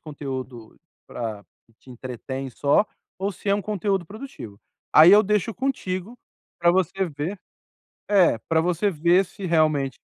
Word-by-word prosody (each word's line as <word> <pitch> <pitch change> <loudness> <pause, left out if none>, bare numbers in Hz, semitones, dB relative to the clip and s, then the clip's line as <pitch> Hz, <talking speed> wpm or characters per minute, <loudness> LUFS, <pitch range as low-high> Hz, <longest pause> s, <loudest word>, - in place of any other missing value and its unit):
conteúdo 130 -6 -7 0.3
pra 110 -4 -5 0.2
que 115 - -30
te - - -22
entretém 130 +2 -6
só 145 - +2 0.3
ou 195 +2 -1
se 200 - -8
é 200 - +4
um 205 - -2
conteúdo 200 -2 -1
produtivo. 200 - -10 0.3
Aí 160 +4 +9
eu 210 +1 +8
deixo 210 +2 0
contigo 230 -4 -3 0.4
pra 170 - +5
você 190 +1 0
ve 155 +6 -4 0.8
É, 185 - +5
pra 160 - +3
você 180 +4 0
ver 170 +3 +3
se 190 +2 -9
realmente 155 -6 +1
170 Hz, 150 wpm, -24 LUFS, 135-200 Hz, 0.8 s, Aí